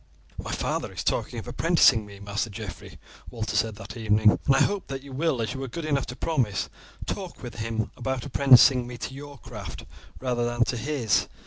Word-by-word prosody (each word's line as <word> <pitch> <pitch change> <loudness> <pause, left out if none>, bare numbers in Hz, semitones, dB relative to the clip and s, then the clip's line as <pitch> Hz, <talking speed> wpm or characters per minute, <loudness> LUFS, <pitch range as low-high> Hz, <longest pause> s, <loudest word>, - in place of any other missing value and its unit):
"My - - -5
father - - -2
is - - -5
talking - - -1
of - - -6
apprenticing 110 -2 +4
me, 100 -1 -12
Master 100 +3 -2
Geoffrey," 105 -2 -8 0.3
Walter 110 -2 -4
said 110 0 +1
that 110 - -9
evening. 110 -2 +4
"I 135 - +5
hope 205 -1 -1
that 135 0 -5
you 140 - -11
will, 140 -4 +1
as 110 - -2
you 135 - -6
were 135 - -3
good 160 +6 -5
enough 140 -3 0
to 125 - -6
promise, 125 -10 0 0.4
talk 185 -7 -5
with 120 -2 -7
him 110 0 -2
about 130 0 -3
apprenticing 130 -2 +6
me 120 0 -7
to 130 - -5
your 145 +1 -9
craft - - -8 0.3
rather 125 -2 0
than 120 0 +2
to 120 - -1
his. 125 -5 +1
120 Hz, 200 wpm, -26 LUFS, 110-135 Hz, 0.4 s, apprenticing